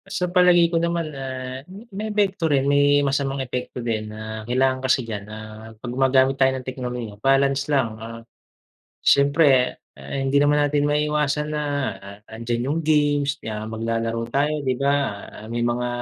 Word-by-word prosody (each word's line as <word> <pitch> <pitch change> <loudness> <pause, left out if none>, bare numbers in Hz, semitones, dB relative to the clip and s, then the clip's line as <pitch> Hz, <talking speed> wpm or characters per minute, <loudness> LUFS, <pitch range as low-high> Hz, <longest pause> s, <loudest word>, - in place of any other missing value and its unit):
Sa 180 - -1
palagay 175 -2 +5
ko 165 - +2
naman 170 -2 -1
ah, 130 -1 -6
ma 190 - -10 0.2
may 215 +3 -4
epekto 195 -5 +1
rin 140 -2 +2
may 145 0 +4
masamang 135 0 0
epekto 125 -2 -4
din 110 -2 -2
na 110 0 -7
kailangan 130 +1 +2
kasi 130 -1 +1
diyan 105 -3 -5
ah 110 +1 -10
'pag 120 +2 -6
gumagamit 130 +1 +3
tayo 130 0 +4
ng 130 - -8
teknolohiya 125 -4 -5
balance 135 +2 +2
lang, 120 -7 0
ah, 115 +1 -8 0.8
syempre 140 -2 +4 0.2
hindi 135 - -1
naman 145 0 +3
natin 145 0 +1
maiiwasan 150 0 0
na 150 - -1 0.6
andiyan 120 +4 -3
yung 165 - -1
games 145 -2 +2
na 110 0 -4
maglalaro 115 +1 -2
tayo 145 +1 0
'di 130 - +2
ba 140 +1 +3 0.5
may 120 +2 -3
mga, 120 +1 0
135 Hz, 155 wpm, -23 LUFS, 115-145 Hz, 0.8 s, palagay